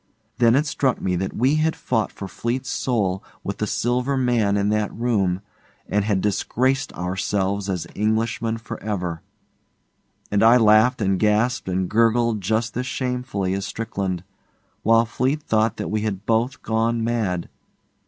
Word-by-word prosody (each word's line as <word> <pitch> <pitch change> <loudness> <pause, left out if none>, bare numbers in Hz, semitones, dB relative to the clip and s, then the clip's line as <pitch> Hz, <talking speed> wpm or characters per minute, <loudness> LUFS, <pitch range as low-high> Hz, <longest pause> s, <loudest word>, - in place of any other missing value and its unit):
Then 115 -1 +5
it 145 +3 +3
struck 135 -4 0
me 90 -1 -1
that 95 +2 -3
we 135 +6 +3
had 160 +1 +1
fought 110 -4 -1
for 100 - -7
Fleete's 120 +8 -3
soul 100 -7 0 0.2
with 100 - -4
the 105 - 0
Silver 125 +5 0
Man 120 -6 +2
in 100 0 +1
that 105 -1 0
room, 100 -6 0 0.5
and 105 0 +1
had 100 -2 +1
disgraced 130 +6 0
ourselves 95 +2 -1
as 90 -4 -2
Englishmen 110 +1 0
for 115 0 -8
ever, 90 -6 -3 1.1
and 100 - +2
I 115 +2 +7
laughed 110 +2 +5
and 95 -1 +1
gasped 110 +1 +1
and 95 0 0
gurgled 115 +1 +2
just 110 +3 -1
as 125 +1 -2
shamefully 125 -7 -2
as 100 +1 -2
Strickland, 95 -5 -3 0.6
while 115 +1 +4
Fleete 130 +6 -1
thought 110 -2 +1
that - - -4
we 110 0 0
had 105 -2 -3
both 115 +3 0
gone 115 +1 0
mad. 110 -7 -1
110 Hz, 155 wpm, -23 LUFS, 100-120 Hz, 1.1 s, I